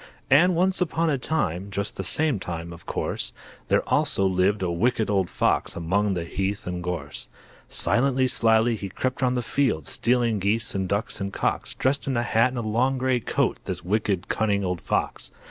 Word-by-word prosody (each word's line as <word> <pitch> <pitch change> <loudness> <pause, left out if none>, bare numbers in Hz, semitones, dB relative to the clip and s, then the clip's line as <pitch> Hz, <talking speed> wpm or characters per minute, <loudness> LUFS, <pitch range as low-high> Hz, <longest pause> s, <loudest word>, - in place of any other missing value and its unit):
And 175 +6 +6
once 185 +2 +2
upon 165 -2 +1
a 140 - 0
time 100 - -1
Just 100 +1 -3
the 95 - -4
same 145 - +1
time, 85 -1 -5
of 85 - -14
course, - - -3 0.3
There - - +1
also 95 - +2
lived 95 +2 +2
a 90 - 0
Wicked 110 +4 +1
Old 95 -3 +1
Fox - - 0
Among 95 +4 0
the 85 - -2
heath 95 +4 -3
and 90 -1 -4
gorse. 85 -5 -5 0.4
Silently, 130 +1 +2
slyly, 115 -1 +3
he 100 -2 -6
crept 130 +8 -3
round 125 -1 +2
the 125 - -1
fields, 120 - 0
Stealing 120 -3 +1
geese 105 +4 0
and 95 -1 -2
ducks 105 0 -2
and 100 0 -2
cocks, - - -2
Dressed 135 +2 0
in 130 -3 0
a 120 - +1
hat 120 +1 +3
and 120 -3 -4
long 125 +5 +1
great 130 -2 0
coat, - - +1
This - - -4
wicked, 100 -1 0
cunning 100 -2 0
old 90 -2 -2
Fox. - - -2
105 Hz, 190 wpm, -25 LUFS, 95-130 Hz, 0.4 s, And